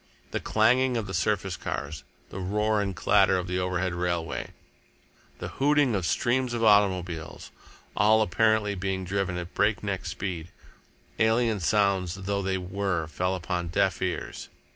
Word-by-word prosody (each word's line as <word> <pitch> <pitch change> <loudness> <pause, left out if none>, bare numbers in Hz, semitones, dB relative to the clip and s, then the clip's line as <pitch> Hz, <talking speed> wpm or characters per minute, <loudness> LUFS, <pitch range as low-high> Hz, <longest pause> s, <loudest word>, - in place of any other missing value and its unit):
The - - -1
clanging 125 +3 +2
of 110 - -2
the 95 - -7
surface 95 +1 0
cars, 70 0 -5 0.3
the 95 - -6
roar 105 +3 0
and 100 -2 -3
clatter 95 -1 +4
of 90 - -2
the 90 0 -2
overhead 90 0 -1
railway, 85 -1 -2 0.9
the - - -6
hooting 145 -2 +2
of 95 -5 0
streams 125 0 +1
of 115 - -2
automobiles, 95 -6 +1 0.4
all 110 +1 +4
apparently 110 +1 +2
being 95 -1 -3
driven 95 -1 -1
at 90 0 -6
breakneck 100 -2 0
speed, 90 -4 -4 0.7
alien 110 -1 +2
sounds 95 -2 +1
though 100 +1 -2
they 95 0 -1
were, 90 -2 -2
fell 90 +4 -2
upon 90 -1 -3
deaf 85 - 0
ears. - - -4
95 Hz, 145 wpm, -27 LUFS, 90-105 Hz, 0.9 s, clatter